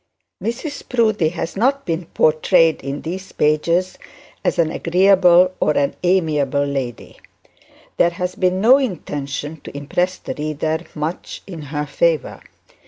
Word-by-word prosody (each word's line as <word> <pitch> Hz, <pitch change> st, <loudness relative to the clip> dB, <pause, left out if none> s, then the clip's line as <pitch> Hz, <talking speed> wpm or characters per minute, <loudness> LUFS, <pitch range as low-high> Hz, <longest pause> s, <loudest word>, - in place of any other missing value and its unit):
Mrs 260 Hz, +6 st, -5 dB
Proudie 215 Hz, -9 st, +2 dB
has 170 Hz, 0 st, -5 dB
not 270 Hz, +7 st, +1 dB
been 165 Hz, 0 st, -3 dB
portrayed 160 Hz, +1 st, +3 dB
in 140 Hz, +1 st, -5 dB
these 185 Hz, +4 st, -6 dB
pages 165 Hz, +5 st, +1 dB, 0.4 s
as -, -, 0 dB
an 165 Hz, -2 st, +2 dB
agreeable 180 Hz, 0 st, +4 dB
or 145 Hz, -2 st, +2 dB
amiable 150 Hz, -6 st, +1 dB
lady. 135 Hz, -5 st, -5 dB, 0.8 s
There 170 Hz, -, +4 dB
has 180 Hz, +1 st, -4 dB
been 185 Hz, 0 st, 0 dB
no 245 Hz, +7 st, +6 dB
intention 150 Hz, -, -4 dB
to -, -, -8 dB
impress 175 Hz, +6 st, -1 dB
the -, -, -6 dB
reader 155 Hz, +1 st, -2 dB, 0.2 s
much 155 Hz, +3 st, -5 dB
in 175 Hz, -5 st, -8 dB
her 150 Hz, 0 st, -2 dB
favour. 155 Hz, +1 st, 0 dB
170 Hz, 130 wpm, -20 LUFS, 150-185 Hz, 0.8 s, no